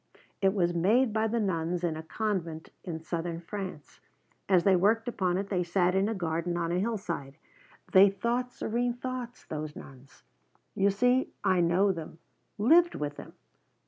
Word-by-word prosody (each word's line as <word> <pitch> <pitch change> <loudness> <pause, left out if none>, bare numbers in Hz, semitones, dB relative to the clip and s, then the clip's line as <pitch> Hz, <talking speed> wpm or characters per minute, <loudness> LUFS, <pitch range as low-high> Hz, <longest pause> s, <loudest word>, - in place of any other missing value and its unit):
It 195 0 +3
was 175 -3 +1
made 215 +8 +3
by 220 0 +1
the 230 +2 0
nuns 175 -3 -1
in 165 -2 0
a 160 - -5
convent 170 -3 -3
in 170 -3 -4
Southern 170 0 -3
France. 185 -3 -7 0.5
As 185 -3 +5
they 195 0 +5
worked 215 +5 +2
upon 185 -6 0
it 195 +1 -3
they 185 -3 0
sat 180 +1 +1
in 195 +2 +2
a 225 - -2
garden 170 -1 -2
on 170 -1 -1
a 175 - +1
hillside. 180 -10 -3 0.5
They 195 +1 +8
thought 235 +5 -2
serene 240 +1 -1
thoughts, 250 -1 -6
those 155 -1 -5
nuns. 135 0 -13 0.5
You 200 +1 +3
see 250 +6 +2
I 185 - +3
know 180 +4 +3
them, 165 -3 -7 0.4
lived 330 +11 +5
with 145 -1 -4
them. - - -10
190 Hz, 170 wpm, -29 LUFS, 170-220 Hz, 0.5 s, They